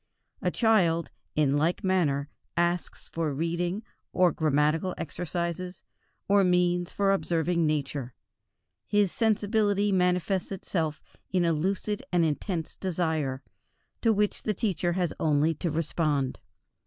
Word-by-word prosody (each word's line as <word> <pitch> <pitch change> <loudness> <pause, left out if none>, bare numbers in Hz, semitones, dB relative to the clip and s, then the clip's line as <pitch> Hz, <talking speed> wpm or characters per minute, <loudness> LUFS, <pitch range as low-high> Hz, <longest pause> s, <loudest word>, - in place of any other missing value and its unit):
A - - +1
child, 180 -8 +2 0.2
in 145 -2 +3
like 160 +4 +1
manner, 155 -7 +1 0.3
asks 175 0 -1
for 165 -2 -2
reading, 175 +6 -1 0.3
or 180 -1 +4
grammatical 155 +4 +1
exercises, 175 +3 -4 0.4
or 200 0 +5
means 180 -1 +2
for 200 -1 +2
observing 170 -3 +1
Nature. 140 -4 -2 0.7
His 205 -3 +2
sensibility 205 -2 +2
manifests 180 +1 +1
itself 165 -5 -2 0.3
in 180 -2 +2
a 165 - +3
lucid 195 +6 -1
and 175 -2 +3
intense 160 +2 -2
desire, 160 -7 -1 0.6
to 225 - +4
which 210 -1 +1
the 215 - -1
teacher 180 -5 0
has 175 -3 0
only 155 +1 +2
to 170 +3 -3
respond. 150 -4 0
175 Hz, 120 wpm, -28 LUFS, 155-190 Hz, 0.7 s, or